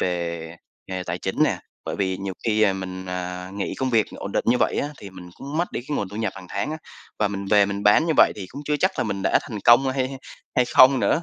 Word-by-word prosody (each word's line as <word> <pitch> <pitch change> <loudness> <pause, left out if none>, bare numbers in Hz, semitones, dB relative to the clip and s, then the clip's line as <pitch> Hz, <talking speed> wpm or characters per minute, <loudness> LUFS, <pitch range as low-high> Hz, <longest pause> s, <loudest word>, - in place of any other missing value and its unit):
về 85 -2 -3 0.3
nghề 95 -1 -4
tài - - -3
chính - - -1
nè. - - 0 0.3
Bởi - - -4
vì 95 -2 -1
nhiều 95 0 -4
khi, 110 -1 +2
ờ, 100 -2 +4
mình, 95 -1 -6
ờ, 90 0 -5
nghỉ 100 - -3
công 130 -1 -2
việc 110 -3 +3
ổn 100 - -6
định - - 0
như 125 - +5
vậy - - +1
á, 145 - -1
thì 100 - -10
mình 90 -1 -11
cũng 140 +3 -7
mất 175 +2 -1
đi - - -3
cái 145 - -1
nguồn 100 - -2
thu 100 - -9
nhập 110 -3 -1
hàng 95 -1 -10
tháng 100 +9 -2
á, 155 - -3 0.4
và 105 -1 +2
mình 100 0 -4
về 105 -2 +6
mình 100 0 -4
bán 105 +11 +5
như 160 - +2
vậy - - +6
thì 100 -3 -6
cũng 145 - -8
chưa 150 0 0
chắc - - +2
là - - +1
mình 100 -2 -3
đã - - +3
thành 110 - -6
công 120 +3 +7
hay - - -2 0.2
hay 135 0 -8 0.4
hay 125 - +5
không 130 +1 +6
nữa. 165 - +2
100 Hz, 285 wpm, -23 LUFS, 95-125 Hz, 0.4 s, công